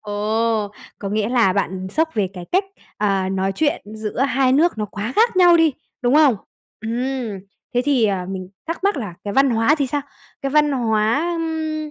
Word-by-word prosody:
Ồ! 215 +1 -1 0.3
Có 200 - -4
nghĩa 210 +1 0
là 235 -7 +3
bạn 190 -1 -2
sốc 320 +10 +1
về 200 -4 0
cái 180 -1 -7
cách, 385 +2 +3 0.3
à, 195 -2 +1
nói 190 0 -1
chuyện 295 +4 0
giữa 215 +1 -5
2 265 -1 +2
nước 310 -3 +3
nó 210 - 0
quá 210 +4 -5
khác 455 -3 +3
nhau 350 -2 +7
đi, 325 -3 +4 0.3
đúng 245 +3 +2
không? 295 -7 +5 0.4
Ừm, 235 -2 -3 0.4
thế 245 - +2
thì, 270 -6 +3
à, 190 -3 0
mình 185 -1 -5 0.2
thắc 335 +4 -4
mắc 400 -5 +2
là 205 -9 -5
cái 200 - -3
văn 270 0 +4
hóa 230 +6 +3
thì 280 -3 -1
sao? 290 +3 -1 0.4
Cái 275 - -1
văn 295 0 +3
hóa, 230 +6 +1
ưm, 315 -2 -3
240 Hz, 195 wpm, -21 LUFS, 205-295 Hz, 0.4 s, nhau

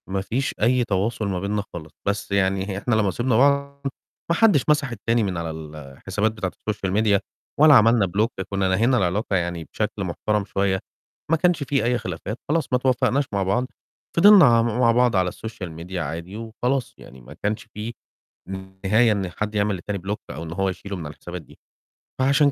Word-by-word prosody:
ما 95 0 -1
فيش 130 +8 -2
أي 125 +3 +3
تواصل 105 +1 -1
ما 95 -2 -1
بيننا 100 +2 -2
خالص، 80 -3 -8
بس 100 0 -2
يعني 95 0 +1
هي 95 - -3
إحنا 110 +3 0
لمّا 105 -3 +2
سِبنا 120 +4 +1
بعض 140 +1 +2 0.5
ما 170 - +3
حدش 185 - +4
مسح 150 -4 +2
التاني 115 +1 0
من 95 -4 -2
على 85 -1 -3
الحسابات 80 +7 -4
بتاعة 105 -4 -4
السوشيال 100 -3 -3
ميديا 105 0 +3 0.4
ولا 155 0 +8
عملنا 115 -2 +5
بلوك، 105 +6 0 0.2
كنّا 100 -1 0
نهينا 115 +7 +3
العلاقة 100 +2 0
يعني 85 -2 -1
بشكل - - -2
محترم 105 -1 -1
شوية، 95 -1 0 0.5
ما 165 - +5
كانش 175 -3 +2
في 140 0 0
أي 120 +1 +2
خلافات، 95 +3 -5
خلاص 160 +1 +1
ما - - +5
اتوفّقناش 130 +2 +1
مع 100 -1 +1
بعض، 100 +7 +1 0.5
فِضِلنا 200 -1 +9
عم 115 -3 +5
مع 120 -2 +5
بعض 120 -1 +3
على 90 -1 +2
السوشيال 100 -4 -7
ميديا 85 +3 -5
عادي 85 +6 -5
وخلاص، 120 +4 -2
يعني 65 0 -14
ما - - -12
كانش 105 +1 -1
في 110 +3 -5 0.9
نهاية 110 +4 +4
إن 100 -3 -1
حد 105 +2 -4
يعمل 105 -1 +1
للتاني 100 +3 -4
بلوك 100 +4 -4
أو 80 +5 -6
إن 80 0 -6
هو 95 +1 0
يشيله 100 +2 -6
من 85 -4 -6
على 75 - -7
الحسابات 90 +3 -8
دي، 75 - -19 0.6
فعشان 140 +2 +4
105 Hz, 190 wpm, -23 LUFS, 95-125 Hz, 0.9 s, فِضِلنا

